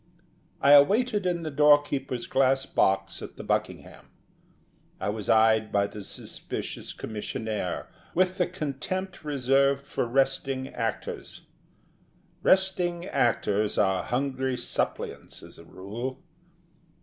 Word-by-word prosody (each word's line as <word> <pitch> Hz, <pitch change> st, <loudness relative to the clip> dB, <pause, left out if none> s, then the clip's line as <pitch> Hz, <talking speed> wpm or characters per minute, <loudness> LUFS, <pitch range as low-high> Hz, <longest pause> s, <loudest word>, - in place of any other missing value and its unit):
I 145 Hz, +1 st, +9 dB
waited 210 Hz, -, +1 dB
in 175 Hz, -2 st, -1 dB
the 155 Hz, -, -4 dB
doorkeeper's 140 Hz, -4 st, +3 dB
glass 135 Hz, +1 st, +2 dB
box 95 Hz, -2 st, +1 dB
at -, -, -8 dB
the -, -, -7 dB
Buckingham. -, -, -3 dB, 0.9 s
I -, -, -2 dB
was 105 Hz, -1 st, -4 dB
eyed 110 Hz, -1 st, +4 dB
by 100 Hz, 0 st, +2 dB
the 105 Hz, +1 st, -7 dB
suspicious 95 Hz, -, -6 dB
commissionaire 110 Hz, -3 st, -4 dB, 0.3 s
with 185 Hz, +1 st, +2 dB
the 180 Hz, -, +3 dB
contempt 180 Hz, +3 st, -4 dB
reserved 140 Hz, -1 st, +2 dB
for 125 Hz, -, -2 dB
resting 135 Hz, +1 st, 0 dB
actors. 115 Hz, -4 st, -4 dB, 1.0 s
Resting 180 Hz, -2 st, +2 dB
actors 110 Hz, -, +1 dB
are 95 Hz, -2 st, +2 dB
hungry 130 Hz, 0 st, -1 dB
suppliants -, -, -4 dB
as -, -, -13 dB
a 85 Hz, -, -13 dB
rule. 110 Hz, +9 st, -6 dB
135 Hz, 115 wpm, -27 LUFS, 110-150 Hz, 1.0 s, I